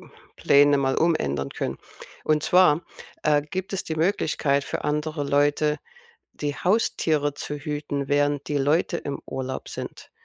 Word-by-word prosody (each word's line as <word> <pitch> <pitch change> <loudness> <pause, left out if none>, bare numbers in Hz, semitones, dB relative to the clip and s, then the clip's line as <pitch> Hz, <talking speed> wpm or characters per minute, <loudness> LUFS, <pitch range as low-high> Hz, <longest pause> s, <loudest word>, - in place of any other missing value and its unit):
hm, - - -23
Pläne 145 0 +5
mal 135 -1 +1
umändern 70 - +1
können. - - -4 0.4
Und 155 -1 +2
zwar, 175 -3 +4 0.4
äh, 150 -1 +3
gibt 185 +6 -5
es 190 - -1
die 160 - -4
Möglichkeit 155 -5 +1
für - - -4
andere 150 0 -1
Leute 145 +1 +2 0.5
die 145 -1 -4
Haustiere 160 -7 +1
zu 150 - -5
hüten, 145 -1 -4
während 145 0 +1
die 145 -1 0
Leute 155 +5 +1
im 140 -3 -5
Urlaub 130 0 -5
sind. - - -8
145 Hz, 145 wpm, -25 LUFS, 140-155 Hz, 0.5 s, Pläne